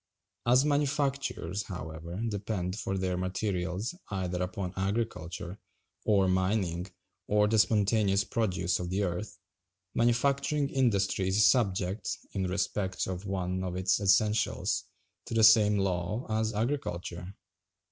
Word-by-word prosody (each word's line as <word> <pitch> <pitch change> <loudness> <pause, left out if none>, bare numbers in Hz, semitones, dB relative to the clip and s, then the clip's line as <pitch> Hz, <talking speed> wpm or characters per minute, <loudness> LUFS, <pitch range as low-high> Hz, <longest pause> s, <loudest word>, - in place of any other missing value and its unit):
As 125 +3 +5
manufactures, 140 - 0
however, 85 0 -6
depend 100 -3 -3
for 95 -2 -3
their 95 -1 -1
materials 95 - -2 0.2
either 90 -2 -2
upon 90 0 -3
agriculture, 95 -3 -3 0.5
or 100 -3 +4
mining, 95 -1 0 0.4
or 105 0 +3
the 110 +1 +2
spontaneous 105 -2 +3
produce 95 -6 0
of 90 -1 -4
the 95 +3 0
earth, 90 +1 -3 0.6
manufacturing 140 +4 +1
industry 100 -8 +1
is 100 +2 +4
subject, 100 -4 +1 0.2
in 95 -1 -1
respect 95 0 -1
of 95 +2 -5
one 95 -1 -2
of 90 -1 -3
its 90 0 +2
essentials, 105 +2 +2 0.4
to - - -4
the 110 - +4
same 105 -1 +7
law 95 +3 -1
as 110 0 +1
agriculture. 100 -7 -3
95 Hz, 120 wpm, -30 LUFS, 90-110 Hz, 0.6 s, same